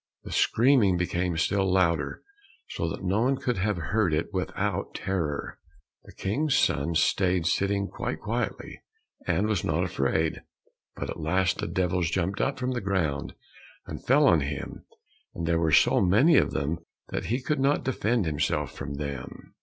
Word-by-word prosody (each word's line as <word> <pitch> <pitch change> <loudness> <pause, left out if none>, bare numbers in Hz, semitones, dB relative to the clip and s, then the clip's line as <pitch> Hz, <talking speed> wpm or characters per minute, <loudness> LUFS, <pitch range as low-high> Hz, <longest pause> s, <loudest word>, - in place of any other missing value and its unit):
The - - -9
screaming 115 -7 +3
became 90 -1 -1
still 95 +3 +1
louder, 85 -5 +1 0.5
so 85 - -2
that 80 - -6
no 95 +4 +1
one 130 +3 +2
could 125 -2 -2
have 100 +1 0
heard 90 +1 0
it 85 +6 -2
without 95 +1 -2
terror. 85 -7 -3 0.5
The - - -13
King's 135 +9 0
son 75 +4 +1
stayed 90 +1 +2
sitting 100 +3 +1
quite - - -4
quietly, - - -4 0.5
and 100 - +1
was 105 -4 0
not 80 +3 0
afraid; 80 -2 0 0.5
but - - -4
at - - -7
last 95 +4 +1
the - - -2
devils 90 -2 0
jumped 95 +3 -1
up 135 - 0
from 130 0 -2
the 125 -2 -2
ground, 90 -8 -1 0.5
and - - -8
fell 145 +4 +4
on 85 - +5
him, 70 -1 -5 0.5
and 85 - -3
there 85 0 +1
were 80 -2 +1
so - - +5
many 110 - +5
of - - +4
them 75 +4 -2 0.3
that - - -3
he 120 +3 0
could 150 +2 -1
not 140 +2 +2
defend 120 -4 0
himself 75 -1 -1
from 70 +1 -5
them. 70 -3 -7
95 Hz, 170 wpm, -27 LUFS, 80-105 Hz, 0.5 s, on